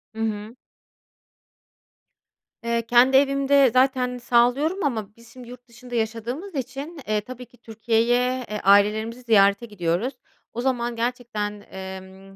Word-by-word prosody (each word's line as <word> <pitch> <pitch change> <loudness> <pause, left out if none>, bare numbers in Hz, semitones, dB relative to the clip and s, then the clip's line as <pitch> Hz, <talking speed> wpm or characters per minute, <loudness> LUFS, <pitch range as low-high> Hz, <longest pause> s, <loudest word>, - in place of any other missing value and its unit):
Hı 225 - -5
hı. 215 +1 -3 2.1
Eee, 235 0 0
kendi 245 +3 +4
evimde 275 -1 +3
zaten 255 -1 +2
sağlıyorum 245 +9 +1
ama 220 -7 -3
biz 230 0 -18
şimdi 250 -2 -12
yurt 250 0 -13
dışında 245 +1 -10
yaşadığımız 235 - -4
için, 275 +5 -6
eee, 210 0 0
tabii 250 +3 -10
ki 245 - -24
Türkiye'ye, 235 +3 0
eee, 210 0 -4
ailelerimizi 210 +4 +3
ziyarete 200 -2 +3
gidiyoruz. 205 +3 -2 0.4
O 240 - -4
zaman 240 -2 -1
gerçekten, 230 -3 -3
emm 190 0 -10
235 Hz, 125 wpm, -23 LUFS, 215-255 Hz, 2.1 s, kendi